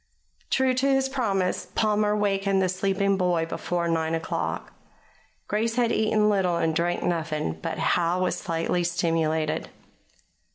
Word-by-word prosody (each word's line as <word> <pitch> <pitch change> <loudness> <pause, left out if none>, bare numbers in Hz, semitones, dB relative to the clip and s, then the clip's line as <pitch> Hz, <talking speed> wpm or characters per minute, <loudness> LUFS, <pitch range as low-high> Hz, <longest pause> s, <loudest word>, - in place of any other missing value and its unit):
True 265 -1 +2
to 260 +2 +1
his 270 -1 +3
promise, 205 -9 -1
Palmer 210 -1 +2
wakened 195 -1 +1
the 185 -1 +2
sleeping 195 +1 +1
boy 175 -3 +1
before 170 +1 -2
nine 165 -1 0
o'clock. 165 - -3 0.7
Grace 225 +2 0
had 240 -2 +2
eaten 215 -1 +2
little 190 -4 +2
and 165 -1 +1
drunk 175 +1 0
nothing; 155 - -2
but - - -3
Howe 175 +1 +1
was 180 - 0
slightly 170 +1 -1
stimulated. 160 - 0
185 Hz, 135 wpm, -25 LUFS, 165-210 Hz, 0.7 s, his